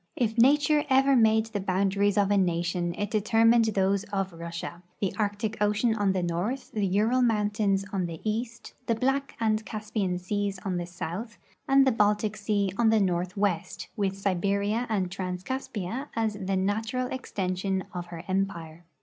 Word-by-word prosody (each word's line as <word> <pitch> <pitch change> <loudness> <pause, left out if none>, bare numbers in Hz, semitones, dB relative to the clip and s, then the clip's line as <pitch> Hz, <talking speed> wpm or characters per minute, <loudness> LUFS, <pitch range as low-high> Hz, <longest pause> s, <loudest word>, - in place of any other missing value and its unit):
If 225 -3 0
nature 290 +4 +4
ever 270 +1 +5
made 220 -2 +4
the 220 -2 -4
boundaries 195 +1 +1
of 200 -1 +3
a - - +4
nation, 175 -1 0
it 205 0 -2
determined 225 +2 +4
those 195 -2 +1
of 195 -3 -3
Russia 170 +1 -6
— - - -40
the 195 - -1
Arctic 210 +1 -2
ocean 210 +3 +2
on 205 -3 +1
the 185 -1 -1
north, 180 +10 -2
the 205 -2 0
Ural 215 +7 +2
mountains 210 -4 +1
on 185 -3 0
the 165 -2 -7
east, 225 +2 -3
the 230 - +2
Black 270 +4 0
and 220 -1 +1
Caspian 210 -4 -2
seas 200 +2 -2
on 185 -2 -1
the 175 -1 -3
south, 180 +6 -6 0.3
and 270 0 +5
the 265 - +4
Baltic 210 -1 +1
sea 205 -2 0
on 230 -2 +5
the 220 0 +4
northwest, 185 -1 -1
with 195 -2 -1
Siberia 200 +4 0
and 190 -5 0
Trans 180 -1 -4
Caspia 255 0 -4
as 225 -1 0
the 195 -1 -2
natural 220 +6 -1
extension 190 -5 -2
of 175 -1 -5
her 170 -1 -8
empire. 175 -4 -2
205 Hz, 170 wpm, -27 LUFS, 185-225 Hz, 0.3 s, ever